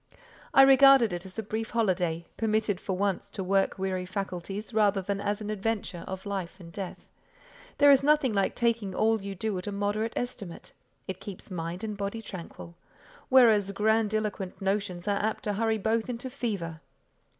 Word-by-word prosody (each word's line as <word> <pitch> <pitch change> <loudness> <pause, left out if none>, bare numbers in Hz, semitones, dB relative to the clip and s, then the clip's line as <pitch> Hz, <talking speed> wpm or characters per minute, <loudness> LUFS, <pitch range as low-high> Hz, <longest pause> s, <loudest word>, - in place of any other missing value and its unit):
I 270 - +8
regarded 270 -5 +7
it 175 +2 -5
as 185 - -13
a 220 - -2
brief 220 +2 -3
holiday, 180 -7 0
permitted 215 -3 0
for 190 -2 -3
once 195 -1 -1
to 195 - -5
work 195 +1 +1
weary 185 -1 -2
faculties, 195 +3 -5
rather 205 -2 +3
than 200 +1 -3
as 205 +1 -1
an 210 0 -3
adventure 210 -4 -3
of 190 +1 -6
life 195 -2 -4
and 170 -2 -11
death. 190 +1 -7 0.7
There 285 0 +7
is 275 - +6
nothing 290 -4 +3
like 195 -1 +1
taking 230 -5 0
all 220 -1 +2
you 195 0 -6
do 210 +2 -2
at 180 - -8
a - - -2
moderate 205 +3 -1
estimate: 205 -8 -5 0.4
it 190 -1 -5
keeps 200 0 -8
mind 170 +1 -4
and 215 -1 -3
body 200 +3 -4
tranquil; 170 -3 -9 0.6
whereas 220 -6 +5
grandiloquent 215 -2 0
notions 195 -2 -2
are 200 -1 +1
apt 220 +1 -1
to 210 - -1
hurry 220 +1 +1
both 220 +3 0
into 245 +1 -5
fever. 195 - -4
205 Hz, 175 wpm, -28 LUFS, 190-225 Hz, 0.7 s, I